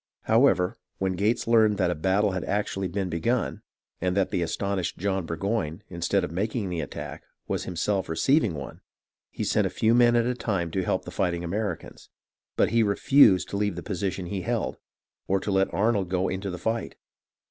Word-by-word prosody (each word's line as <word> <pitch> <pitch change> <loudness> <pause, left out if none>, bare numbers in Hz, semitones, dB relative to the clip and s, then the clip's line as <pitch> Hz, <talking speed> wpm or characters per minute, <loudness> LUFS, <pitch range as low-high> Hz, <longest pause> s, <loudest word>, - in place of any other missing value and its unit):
However, 110 -6 +3 0.2
when 95 0 0
Gates 105 +6 0
learned 110 -3 +4
that 90 -2 +2
a - - +1
battle 95 +5 +1
had 95 -2 -3
actually 100 -2 -1
been 95 +1 -2
begun, 90 +9 -1 0.4
and 90 +2 0
that 95 - +1
the 90 - 0
astonished 95 +1 -2
John 95 -2 -1
Burgoyne, 90 +1 -2
instead 85 +2 0
of 90 - -3
making 105 +3 -2
the 85 -2 -2
attack, 75 - -7 0.3
was - - -2
himself 95 +2 -1
receiving 110 - +2
one, - - -8 0.5
he - - -5
sent - - +2
a - - -3
few 110 +1 +2
men 120 0 +5
at 120 -1 +3
a 125 - +1
time 95 -9 -2
to 95 - 0
help - - -1
the - - -7
fighting 85 -2 -1
Americans; 95 0 -4 0.5
but - - +3
he 115 0 +4
refused 100 -2 +5
to 100 - -3
leave 105 -3 0
the 85 - -6
position 95 -1 -3
he 95 +2 -3
held, - - -2 0.5
or 95 +1 +2
to 100 - -3
let 95 0 +2
Arnold 100 -3 +1
go 95 0 0
into 95 +2 -3
the 90 - -5
fight. 110 +5 -2
95 Hz, 190 wpm, -26 LUFS, 90-105 Hz, 0.5 s, men